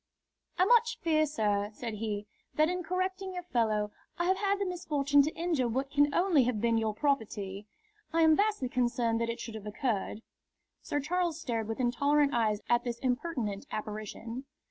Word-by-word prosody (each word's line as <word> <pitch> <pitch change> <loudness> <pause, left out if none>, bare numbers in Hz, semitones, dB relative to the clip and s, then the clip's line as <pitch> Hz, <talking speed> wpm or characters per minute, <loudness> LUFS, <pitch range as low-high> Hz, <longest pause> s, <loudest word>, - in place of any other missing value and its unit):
"I 365 - +5
much 470 +2 +4
fear, 310 -2 +2
sir," 205 -8 0
said 230 -1 -5
he, 210 -1 -3 0.3
"that 310 +3 +3
in 360 0 -2
correcting 370 +2 -2
your 360 - -4
fellow 220 -9 0 0.3
I 345 - 0
have 375 +1 +3
had 400 0 +1
the 400 - -1
misfortune 295 -6 +2
to 300 +3 -1
injure 325 -7 0
what 265 +4 -2
can 290 0 +4
only 340 -6 +3
have 240 -3 0
been 230 0 +2
your 220 -1 -1
property. 210 -7 -1 0.4
I 330 0 +3
am 315 -1 +6
vastly 410 -9 +1
concerned 240 -2 +1
that 230 - 0
it 230 - -3
should 230 - -6
have 215 -1 -7
occurred." 215 -1 -2 0.6
Sir 290 - -2
Charles 340 +1 -1
stared 230 -9 -2
with 225 +2 -4
intolerant 280 +4 +2
eyes 215 -3 +1
at 240 0 +3
this 240 -1 -3
impertinent 245 -5 -2
apparition. 215 +4 -5
255 Hz, 180 wpm, -30 LUFS, 225-330 Hz, 0.6 s, am